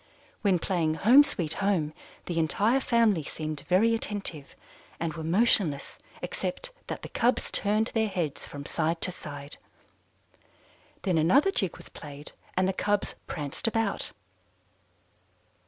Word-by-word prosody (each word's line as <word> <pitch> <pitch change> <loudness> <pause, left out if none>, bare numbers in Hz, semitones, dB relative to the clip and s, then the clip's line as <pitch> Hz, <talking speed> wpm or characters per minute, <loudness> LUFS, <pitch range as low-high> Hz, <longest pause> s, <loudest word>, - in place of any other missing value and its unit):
When 195 -3 +3
playing 165 -3 0
'Home, 240 - +7
Sweet 170 - -1
Home,' 180 -7 +1 0.3
the 170 -2 -1
entire 205 - +3
family 230 - +3
seemed 155 0 -4
very 215 +6 +5
attentive, 195 -10 -2 0.4
and 165 -1 -1
were 160 - -6
motionless 170 -4 +2 0.2
except - - -3 0.2
that - - -5
the - - -4
cubs 245 +2 +1
turned 215 +2 +1
their 220 -1 +2
heads 175 -8 -3
from 140 0 -8
side 165 +3 0
to 185 - +2
side. 145 -4 -8 1.5
Then 180 -4 +2
another 270 - +5
jig 190 - -1
was - - -12
played 145 -1 -10 0.3
and 185 0 +3
the 190 - +1
cubs 205 +1 0
pranced 145 +6 -3
about." 225 -2 0
185 Hz, 135 wpm, -28 LUFS, 155-215 Hz, 1.5 s, Home